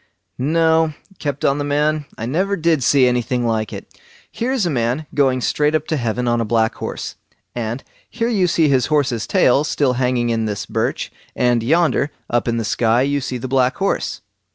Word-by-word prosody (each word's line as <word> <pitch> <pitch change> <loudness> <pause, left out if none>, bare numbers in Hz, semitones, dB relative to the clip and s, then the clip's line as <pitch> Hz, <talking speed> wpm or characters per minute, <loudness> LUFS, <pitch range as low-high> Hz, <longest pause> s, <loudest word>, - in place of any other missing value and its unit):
"No", 160 +2 +2 0.2
kept 145 -2 -3
on 140 +1 +2
the - - -1
man, 150 +1 0
"I 115 - -4
never 185 +11 0
did 160 -4 +1
see 130 +1 +4
anything 125 0 0
like 110 -3 -1
it!—here 240 +3 -7
is 255 -7 +1
a - - +1
man 125 +3 -1
going 135 -3 +2
straight 150 +4 +1
up 155 -1 0
to 160 - +1
heaven 120 -2 -1
on 120 0 +2
a - - +1
black 110 0 +1
horse, - - -6 0.4
and 120 +2 -4 0.3
here 230 0 -2
you 200 -6 +2
see 165 -2 +3
his 130 -4 +2
horse's 135 -7 0
tail 135 +3 +3
still 140 -3 +1
hanging 125 -1 0
in 115 -1 0
this 105 -1 -3
birch; - - -2 0.2
and 120 -1 +2
yonder 150 +1 +2 0.2
up 120 +1 +1
in 115 0 0
the 115 - -2
sky 115 +3 +2
you 140 +1 0
see 125 0 -3
the 125 +2 -5
black 130 0 +2
horse." 195 - -1
130 Hz, 195 wpm, -19 LUFS, 120-155 Hz, 0.4 s, see